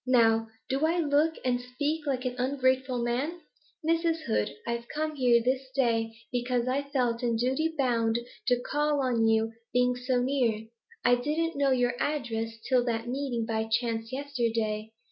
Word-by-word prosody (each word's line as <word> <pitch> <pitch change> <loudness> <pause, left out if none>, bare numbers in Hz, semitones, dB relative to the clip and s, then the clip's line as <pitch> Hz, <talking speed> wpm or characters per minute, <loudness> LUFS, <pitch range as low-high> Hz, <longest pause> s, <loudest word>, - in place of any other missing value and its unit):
Now 225 -3 +4 0.2
do 270 +3 -1
I 330 +2 +3
look 310 0 +2
and 245 -1 +1
speak 290 +5 -2
like 260 -2 -1
an 250 - -1
ungrateful 260 -1 +1
man? 275 +9 -1 0.5
Mrs. 330 0 +2
Hood, 105 -1 0 0.2
I've 235 0 -3
come 310 0 -2
here 245 -4 +4
this 260 +1 0
day 225 -4 +1
because 245 0 0
I 265 +2 +1
felt 245 -4 0
in 235 -2 +1
duty 265 +8 0
bound 235 -4 +2 0.3
to 245 -1 +3
call 295 +2 0
on 235 -3 +2
you, 225 0 +2 0.2
being 250 0 +3
so 250 0 0
near. 245 -4 +1 0.4
I 245 - +6
didn't 300 +6 0
know 280 -1 +2
your 245 -2 +2
address, 225 -6 -2
till 255 -2 +3
that 230 -1 -1
meeting 250 -3 -2
by 220 -1 -1
chance 225 0 -1
yesterday. 230 -6 -1
250 Hz, 165 wpm, -28 LUFS, 230-280 Hz, 0.5 s, I